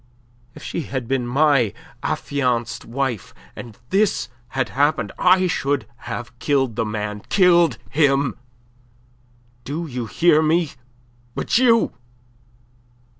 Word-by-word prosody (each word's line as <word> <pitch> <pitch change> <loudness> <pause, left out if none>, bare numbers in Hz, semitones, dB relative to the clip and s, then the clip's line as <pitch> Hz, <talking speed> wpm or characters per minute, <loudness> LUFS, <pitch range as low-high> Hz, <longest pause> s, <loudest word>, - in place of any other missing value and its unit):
if - - -11
she - - -3
had 130 -5 -4
been 130 -2 -1
my 135 -4 +3 0.3
affianced 125 -4 -1
wife 125 -3 -3 0.2
and 115 -3 -10
this 205 +1 +1 0.2
had 130 +2 -2
happened, 145 +4 +1
I 185 0 +5
should 145 -8 0 0.2
have 120 0 -6
killed 135 -6 +1
the 115 -1 0
man 105 -1 -4
killed 175 -3 +4
him! 140 -2 +2 1.3
Do 155 +5 -4
you 125 -6 -5
hear 165 +4 +4
me? 160 0 +2 0.6
But - - +1
you... 230 -3 +4
140 Hz, 115 wpm, -21 LUFS, 120-165 Hz, 1.3 s, I